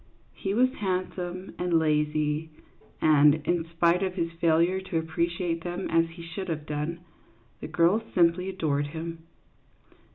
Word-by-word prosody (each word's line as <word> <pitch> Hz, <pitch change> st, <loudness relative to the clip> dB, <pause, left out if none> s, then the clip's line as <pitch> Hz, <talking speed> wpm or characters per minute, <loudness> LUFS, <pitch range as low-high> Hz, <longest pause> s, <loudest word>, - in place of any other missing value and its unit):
He 195 Hz, +1 st, -3 dB
was 255 Hz, +2 st, +3 dB
handsome 185 Hz, -1 st, -3 dB
and 175 Hz, -2 st, +2 dB
lazy, 150 Hz, 0 st, +1 dB, 0.5 s
and, 150 Hz, -1 st, +6 dB
in 175 Hz, -2 st, +1 dB
spite 170 Hz, +2 st, +2 dB
of 190 Hz, -1 st, -1 dB
his 170 Hz, -2 st, -1 dB
failure 170 Hz, +3 st, +2 dB
to 190 Hz, -3 st, -3 dB
appreciate 170 Hz, +1 st, -1 dB
them 175 Hz, +2 st, -3 dB
as 165 Hz, 0 st, +3 dB
he 170 Hz, +1 st, -11 dB
should 170 Hz, +3 st, -6 dB
have 155 Hz, -2 st, -3 dB
done, 150 Hz, +3 st, -3 dB, 0.6 s
the -, -, -6 dB
girls 175 Hz, +6 st, +3 dB
simply 180 Hz, +1 st, +3 dB
adored 145 Hz, -6 st, -1 dB
him. 165 Hz, +1 st, -7 dB
170 Hz, 140 wpm, -27 LUFS, 160-180 Hz, 0.6 s, and